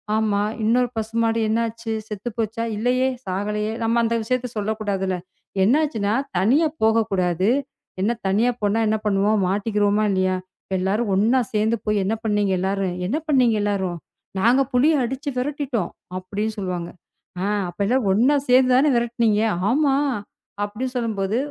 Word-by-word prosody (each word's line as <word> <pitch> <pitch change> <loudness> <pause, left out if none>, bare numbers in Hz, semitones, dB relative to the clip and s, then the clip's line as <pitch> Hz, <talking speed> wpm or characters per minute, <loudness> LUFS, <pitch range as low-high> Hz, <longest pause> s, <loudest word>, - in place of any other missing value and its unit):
ஆமா, 215 -2 +1 0.2
இன்னொரு 245 +3 +2
பசுமாடு 225 +1 0
என்னாச்சு? 230 0 -2 0.2
செத்து 210 +2 -5
போச்சா? 225 +1 -2
இல்லையே. 250 +4 +1 0.2
சாகலையே. 210 +3 -2
நாம 230 +1 +2
அந்த 230 0 +1
விஷயத்தை 255 +2 -1
சொல்லக் 215 +1 -2
கூடாதுல. 195 -3 -1 0.5
என்ன 225 +8 +4
ஆச்சுன்னா, 215 -9 -1 0.2
தனியா 255 - +3 0.2
போகக் 220 0 +3
கூடாது. 185 0 +1 0.5
என்ன, 205 +4 +2 0.2
தனியா 215 +6 +2
போனா 205 +2 +1
என்ன 215 +1 +2
பண்ணுவோம்? 205 +1 +2
மாட்டிக்கிறுவமா? 205 +1 +1
இல்லையா? 185 -1 +1 0.4
எல்லாரும் 200 +4 0
ஒண்ணா 225 +7 +3
சேர்ந்து 215 +2 +2
போய் 210 -2 +1
என்ன 205 - 0
பண்ணீங்க 205 -2 +1
எல்லாரும்? 190 -1 -1
என்ன 255 +10 0
பண்ணீங்க 255 -6 +3
எல்லாரும்? 190 -4 -1 0.4
"நாங்க 240 +7 +4
புலிய 285 +3 +4
அடிச்சு 265 +4 -3
விரட்டிட்டோம்," 265 -5 -2 0.3
அப்படின்னு 205 +4 -3
சொல்லுவாங்க. 180 -3 -3 0.5
ஆ, - - 0 0.2
அப்ப 175 - -13
எல்லாம் 250 -1 +1
ஒண்ணா 250 +9 +4
சேர்ந்து 255 0 +5
தானே 280 +4 +4
விரட்டினீங்க? 235 -3 +1 0.3
ஆமா, 275 +1 +3 0.7
அப்படின்னு 245 +5 -5
சொல்லும்போது, 215 -3 -1
220 Hz, 140 wpm, -22 LUFS, 200-240 Hz, 0.7 s, சேர்ந்து